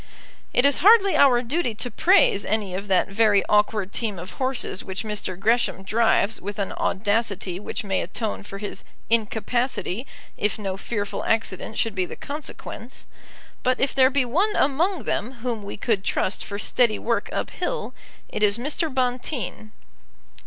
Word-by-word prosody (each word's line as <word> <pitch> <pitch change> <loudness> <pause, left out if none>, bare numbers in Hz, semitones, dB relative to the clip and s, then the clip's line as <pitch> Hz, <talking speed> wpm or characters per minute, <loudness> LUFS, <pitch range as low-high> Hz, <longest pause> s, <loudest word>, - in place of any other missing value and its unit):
It 245 - +3
is 280 -1 +4
hardly 400 -1 +6
our 250 -3 +5
duty 250 -2 -1
to 245 +3 -2
praise 340 - +4
any 210 -4 -1
of 195 +2 -4
that 190 -2 +3
very 205 -1 +3
awkward 210 -2 +2
team 215 -5 -2
of 180 +2 -7
horses 260 -7 -1
which 190 0 -4
Mr. 205 -4 -4
Gresham 225 -2 +1
drives 220 0 +2
with 205 +2 -5
an 200 -2 -2
audacity 205 -3 0
which 210 - -4
may 195 -2 0
atone 215 +4 -3
for 200 -1 -8
his 205 0 -6 0.3
incapacity 230 +1 0 0.3
if 210 0 0
no 195 -3 -3
fearful 205 0 -4
accident 220 -1 -1
should 225 - 0
be 185 -2 -1
the - - -7
consequence; 285 -4 -7 0.6
but 255 0 +1
if 270 - +1
there 260 -1 +5
be 275 -1 +1
one 370 - +1
among 310 - +1
them 225 +4 -2
whom 235 -4 -2
we 200 0 -7
could 205 -2 0
trust 190 - 0
for 200 - -5
steady 215 +1 +2
work 230 0 -1
up - - -3
hill, - - -3 0.3
it - - -5
is 205 0 +4
Mr. 295 +5 -2
Bonteen. 250 -3 -2
220 Hz, 165 wpm, -24 LUFS, 200-255 Hz, 0.6 s, hardly